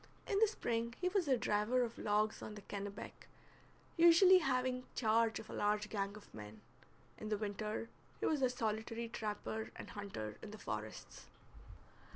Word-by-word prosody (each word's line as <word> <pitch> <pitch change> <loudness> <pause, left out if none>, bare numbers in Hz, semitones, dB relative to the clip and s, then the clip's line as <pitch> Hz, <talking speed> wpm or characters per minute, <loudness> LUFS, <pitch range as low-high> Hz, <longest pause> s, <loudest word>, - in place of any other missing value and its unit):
In 400 - +1
the 445 - +6
spring 235 - -2
he 360 - +1
was 370 -4 +1
a 260 -2 +4
driver 225 +4 +2
of 230 -1 -4
logs 215 +1 +1
on 210 - -6
the 205 - -9
Kennebec, 200 0 -6 0.7
usually 345 +3 +8
having 255 -3 0
charge 225 -1 +3
of - - -8
a - - -8
large 210 0 +1
gang 200 -1 -2
of 210 - -15
men; 105 0 -9 0.6
in 215 - -5
the 210 - +1
winter 210 +2 -3 0.3
he - - -1
was 300 -3 +2
a 255 - +4
solitary 225 -1 -2
trapper 220 0 -3
and - - -8
hunter 150 - -5
in 220 - -7
the 215 - -8
forests. 105 - -6
220 Hz, 170 wpm, -37 LUFS, 210-255 Hz, 0.7 s, usually